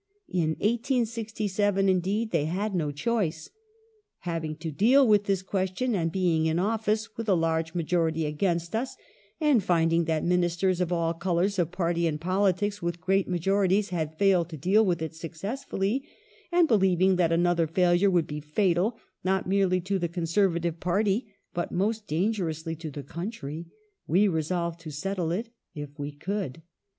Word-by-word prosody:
In 160 -3 0
1867, 220 -4 0
indeed, 195 +4 +1
they 160 -4 +1
had 195 +6 -2
no 160 -5 0
choice. 165 -2 -2 0.3
'* 450 - -36 0.3
Having 165 -3 -3
to 160 0 -5
deal 250 - +5
with 205 -2 +4
this 195 -2 0
question 190 +6 -1
and 165 -5 0
being 165 -3 +1
in 160 +1 +1
office 215 +2 0
with 225 -1 -4
a 190 - +5
large 165 0 0
majority 165 -1 0
against 170 +4 -1
us, 250 +4 -2 0.4
and 295 - +3
finding 165 -1 +2
that 160 -1 0
Ministei 175 +1 +2
s 180 - -2
of 180 -1 0
all 165 -1 +1
colours 180 +3 0
of 170 -2 +1
party 170 -1 0
and 150 -2 -2
politics 195 +3 0
with 170 0 -2
great 190 +2 +1
majorities 195 +2 +1
had 160 -3 -3
failed 185 -3 +3
to 160 - -7
deal 190 +9 +3
with 175 -5 0
it 160 - -4
successfully, 195 - -3 0.5
and 345 -1 +4
believing 190 - +3
that 170 -2 +2
another 170 0 +2
failure 175 +3 +3
would 175 -4 +2
be 150 0 -6
fatal 180 +7 +1 0.3
not 190 0 +1
merely 190 -1 +2
to 190 +2 -1
the 170 -1 -1
Conservative 170 -1 0
party, 205 +5 0 0.2
but 175 - -3
most 210 +3 -1
dangerous 170 -2 -1
to 165 -1 -5
the 145 0 -7
country, 170 -1 -6 0.4
we 195 +5 +4
resolved 170 0 -1
to 165 -1 -8
settle 170 +3 -2
it 220 +7 -2 0.3
if 145 0 -8
we 145 +1 -3
could." 165 -1 -4
180 Hz, 165 wpm, -27 LUFS, 165-200 Hz, 0.5 s, deal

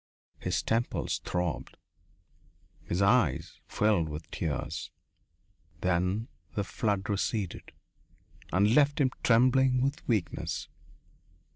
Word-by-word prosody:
His - - -1
temples 115 +2 0
throbbed. 90 -7 -3 1.1
His 90 +3 0
eyes 100 - +2
filled 100 -7 +2
with 75 +1 -7
tears. 75 -3 -3 0.9
Then 90 +5 +1 0.3
the 100 - 0
flood 100 -1 -1
receded 100 -2 -2 0.8
and 100 +4 +4
left 145 +1 +4
him 130 -3 +3
trembling 130 +2 +4
with 140 +2 -1
weakness. 105 -8 -1
105 Hz, 95 wpm, -30 LUFS, 90-120 Hz, 1.1 s, and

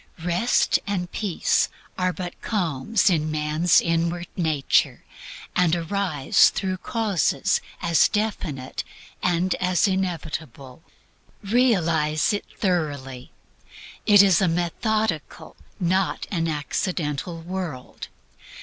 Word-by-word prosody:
Rest 180 +8 +2
and 180 -3 -2
Peace 200 -6 0 0.3
are 185 0 0
but 180 -1 -7
calms 190 - 0
in 155 -5 +2
man's 155 +3 +3
inward 170 +1 -1
nature, 155 -6 +1 0.5
and 175 -2 +3
arise 170 -4 +2
through 185 -1 -3
causes 205 - 0 0.2
as 170 -3 +4
definite 180 -11 -3 0.4
and 180 +1 +1
as 185 +2 +2
inevitable. 160 - -4 0.6
Realize 175 -8 +2
it 205 - -3
thoroughly; 145 - -2 0.8
it 205 -2 +8
is 190 -3 +4
a 190 - +3
methodical, 175 +1 -2 0.2
not 185 +1 0
an 165 -4 0
accidental 155 +1 -2
world. 175 -7 -6
175 Hz, 95 wpm, -24 LUFS, 155-190 Hz, 0.8 s, it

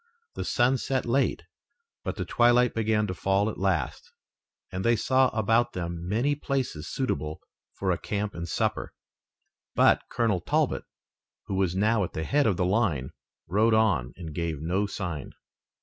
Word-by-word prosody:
The - - -4
sun 130 +1 +2
set 130 +1 -1
late, 135 +3 +1 0.6
but - - -3
the - - -3
twilight 120 0 +4
began 110 -1 +1
to 90 - -3
fall 95 +4 +1
at - - -10
last, 90 -9 -1 0.6
and 95 +1 -3
they 115 0 +4
saw 130 +4 +3
about 115 +1 +1
them 85 -1 -4
many 120 +8 +2
places 130 - -3
suitable 75 - -2 0.4
for 95 -1 0
a 85 - -1
camp 105 0 -3
and 85 0 -6
supper. - - -1 0.8
But - - +5
Colonel 110 -6 +1
Talbot, - - 0 0.6
who - - -5
was 95 -2 +1
now 105 +2 +2
at 90 - -5
the 80 - -3
head 140 - +2
of 100 -5 +1
the 90 - +1
line, 90 - +1 0.3
rode 110 +4 +3
on 95 - +2
and 80 -4 -7
gave 80 -2 -2
no 90 +6 0
sign. 90 -8 -5
100 Hz, 165 wpm, -27 LUFS, 85-115 Hz, 0.8 s, But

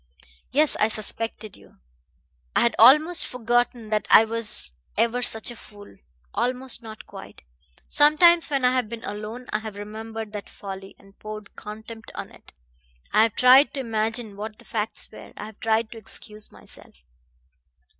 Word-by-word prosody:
Yes, 295 +4 +3
I 215 - +4
suspected 220 0 -3
you! 100 -7 -20 0.8
I - - +4
had 235 - +2
almost 300 +9 +7
forgotten 240 -1 0
that 215 -1 0
I 225 - +8
was 220 - -3 0.2
ever 235 +2 +2
such 225 -1 0
a - - -9
fool. 205 - -14 0.4
Almost; 255 0 -2
not 220 -1 -10
quite. - - -12 0.4
Sometimes 320 +4 +5
when 275 -3 +1
I 250 - +4
have 250 -4 0
been 230 0 -7
alone 215 +3 -6
I 210 - +1
have 215 -2 -8
remembered 220 +1 -7
that 205 -1 -6
folly, 195 -1 -9
and 195 0 -21
poured 215 -1 -9
contempt 220 +1 -9
on - - -6
it. - - -18 0.6
I 215 - +6
have 225 -1 +2
tried 260 +4 +6
to - - -3
imagine 225 -2 -2
what 210 +1 -7
the - - -17
facts 220 0 -3
were. - - -12
I - - -6
have 215 -1 -12
tried 220 0 +1
to 230 - -9
excuse 215 0 -8
myself." - - -14
225 Hz, 165 wpm, -24 LUFS, 215-245 Hz, 0.8 s, I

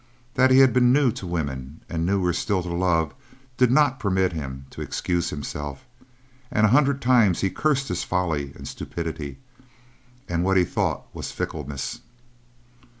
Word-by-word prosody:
That 130 0 +4
he 130 - +6
had 135 -1 +7
been 125 -1 +5
new 135 -2 +4
to 95 - -7
women 70 -4 -4
and 85 0 -2
newer 95 -2 +1
still 95 -1 0
to 85 -1 -4
love 85 -4 +1 0.4
did 125 -1 +4
not 140 0 +3
permit 95 -5 +1
him 65 -4 -6
to - - -8
excuse 85 -2 -1
himself, 75 - -6 0.6
and 110 - +3
a - - +4
hundred 140 +2 +3
times 120 -7 +4
he 95 - +1
cursed 140 -3 +1
his - - -1
folly 80 -7 -1
and - - -9
stupidity, 80 -4 -5 0.9
and 85 0 0
what 95 +1 +3
he 90 - +5
thought - - -1
was - - -5
fickleness. 70 - -4
90 Hz, 160 wpm, -24 LUFS, 80-125 Hz, 0.9 s, had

